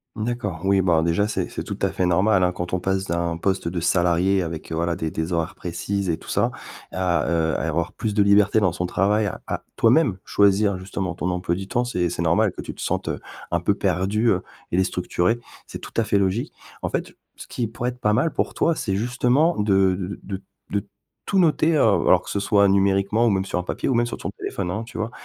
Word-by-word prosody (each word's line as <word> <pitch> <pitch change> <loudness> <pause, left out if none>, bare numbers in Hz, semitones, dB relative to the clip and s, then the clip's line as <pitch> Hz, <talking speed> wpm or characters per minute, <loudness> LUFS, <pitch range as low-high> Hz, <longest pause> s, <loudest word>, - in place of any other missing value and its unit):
D'accord. 110 -7 -3
Oui, 95 0 +4
bah 85 -3 +3
déjà, 85 +5 +1
c'est 105 - -2
c'est - - -5
tout - - -5
à - - +3
fait 90 - 0
normal, 95 +2 +3
hein, 90 - +3
quand 90 0 -5
on 90 - +1
passe 95 +1 -1
d'un 85 -1 -1
poste 95 -1 -1
de 85 0 -2
salarié 90 +2 +2
avec, 80 -2 -5
voilà, 85 +1 0
des 80 -2 -3
des 80 +2 -3
horaires 85 0 -1
précises 90 +3 -3
et 80 - 0
tout - - -16
ça, - - +2 0.4
à, 90 -2 0
heu, 80 -1 +1
à 80 - -2
avoir 85 +2 -1
plus 105 -2 -3
de 105 - +5
liberté 100 +1 +4
dans 95 -4 +2
son 90 0 -2
travail 105 +4 +1 0.2
à, - - -4
toi-même 115 - +3
choisir, 100 0 +3
justement, 95 -1 -4
ton 90 +1 -2
emploi 90 -1 -1
du 95 +1 -6
temps, 120 +2 0
c'est 90 -8 0
c'est 85 0 -3
normal 85 0 +3
que - - -7
tu - - -6
te - - -11
sentes, - - -2
heu, - - -2 0.3
un 85 - +2
peu 100 +3 +2
perdue, 100 +4 +1
heu, 90 - +2 0.3
et 85 - +1
déstructurée, 90 +3 0 0.3
c'est - - -7
tout - - -11
à 115 - +2
fait 105 -2 +1
logique. 100 +4 0 0.3
En - - -2
fait, - - -3 0.2
ce - - -10
qui 120 -3 -2
pourrait 120 +2 -3
être 125 0 -10
pas 105 -1 +2
mal 160 +9 +1
pour - - -1
toi, 165 - +2
c'est 100 -10 -2
justement 125 - +2
de 95 -2 +3
de 95 +1 -5
de 95 -1 -5 0.3
de 100 +1 -1 0.5
tout 195 - +5
noter, 165 -1 +3
heu- - - +2 0.3
alors - - +5
que - - -10
ce 100 - -1
soit 100 0 +4
numériquement 100 +3 +2
ou 115 - +4
même 95 -1 +1
sur 95 - -2
un - - -3
papier - - -3
ou 135 - +2
même 120 0 +2
sur - - -5
ton - - -5
téléphone, 95 -3 -3
hein, 105 +4 -2
tu 120 +1 -10
vois? 110 +2 -2
95 Hz, 240 wpm, -23 LUFS, 90-110 Hz, 0.5 s, de